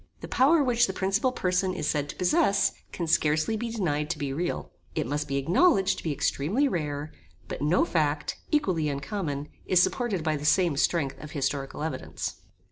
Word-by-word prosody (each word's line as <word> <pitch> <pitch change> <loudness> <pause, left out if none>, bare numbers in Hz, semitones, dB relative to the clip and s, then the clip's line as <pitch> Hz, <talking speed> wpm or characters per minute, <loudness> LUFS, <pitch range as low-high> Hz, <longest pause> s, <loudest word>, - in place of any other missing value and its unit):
The - - -6
power 290 +4 +4
which 240 -2 +3
the 190 - -3
principal 195 +7 +1
person 185 -4 0
is 155 - -3
said 145 -1 0
to - - -6
possess 200 - +3 0.2
can 170 - -3
scarcely 155 +4 +2
be 230 +2 -3
denied 160 -9 -1
to 170 - -1
be 140 -2 -3
real. 175 +5 -3 0.2
It - - 0
must 145 +4 -2
be 140 0 -1
acknowledged 190 - +3
to - - -10
be 160 - -1
extremely 155 - +1
rare; 150 - -3 0.4
but - - -6
no 150 +5 +3
fact, 150 -2 -1
equally 185 - +1
uncommon, 145 0 -3 0.2
is 185 - +4
supported 205 -3 +1
by 155 -1 0
the 145 - -8
same 170 +1 +3
strength 140 -1 0
of 150 - -9
historical 140 0 -2
evidence. 160 - -4
165 Hz, 185 wpm, -27 LUFS, 145-195 Hz, 0.4 s, power